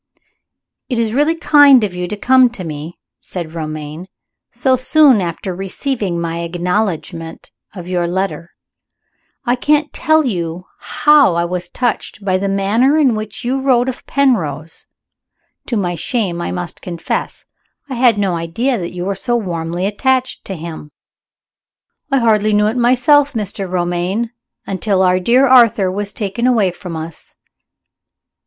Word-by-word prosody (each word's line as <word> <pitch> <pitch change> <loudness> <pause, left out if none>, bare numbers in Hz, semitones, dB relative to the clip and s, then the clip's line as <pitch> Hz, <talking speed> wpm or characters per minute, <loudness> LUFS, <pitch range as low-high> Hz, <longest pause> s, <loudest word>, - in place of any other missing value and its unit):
"It 250 - -1
is 225 -1 0
really 295 +5 +2
kind 290 -6 +6
of 200 -3 -2
you 180 0 -4
to 210 - -5
come 255 +3 +4
to 195 - -5
me," 155 +1 -7 0.2
said 170 -3 -7
Romayne, 155 +1 -6 0.4
"so 255 +2 +1
soon 255 -2 +4
after 175 +2 -4
receiving 195 0 -3
my 170 0 -3
acknowledgment 170 -1 -3 0.2
of 180 -2 -8
your 175 -1 -1
letter. 180 -1 -3 1.0
I 245 0 +2
can't 295 +4 +1
tell 315 -1 +2
you 175 -5 -3
how 295 - +3
I 170 0 +1
was 180 +1 -4
touched 240 -4 -3
by 185 -1 +1
the 200 +1 -1
manner 215 +9 +2
in 275 -6 +3
which 215 0 -5
you 265 +2 -1
wrote 255 -2 +2
of 260 - -6
Penrose. 165 - -1 0.8
To 235 - -1
my 180 -3 -1
shame 175 0 -2
I - - -3 0.3
confess 170 -3 -4 0.4
it, 270 - -6
I - - -3
had 240 -3 +4
no 195 -3 0
idea 215 +10 -1
that 175 -1 -5
you 175 0 -4
were 200 - -1
so 240 +5 -1
warmly 175 -4 -3
attached 260 +5 0
to 195 - -5
him." 160 -2 -8 1.2
"I 275 - +2
hardly 215 -3 +2
knew 210 0 +3
it 215 +2 0
myself, 255 +4 +3
Mr. 200 -4 -4
Romayne, 180 +5 -1 0.3
until 195 0 0
our 185 0 +3
dear 245 +8 +3
Arthur 230 -7 +5
was 205 +1 -3
taken 215 +3 -2
away 220 -7 +2
from 175 -1 -8
us." 160 0 -7
200 Hz, 150 wpm, -17 LUFS, 175-250 Hz, 1.2 s, kind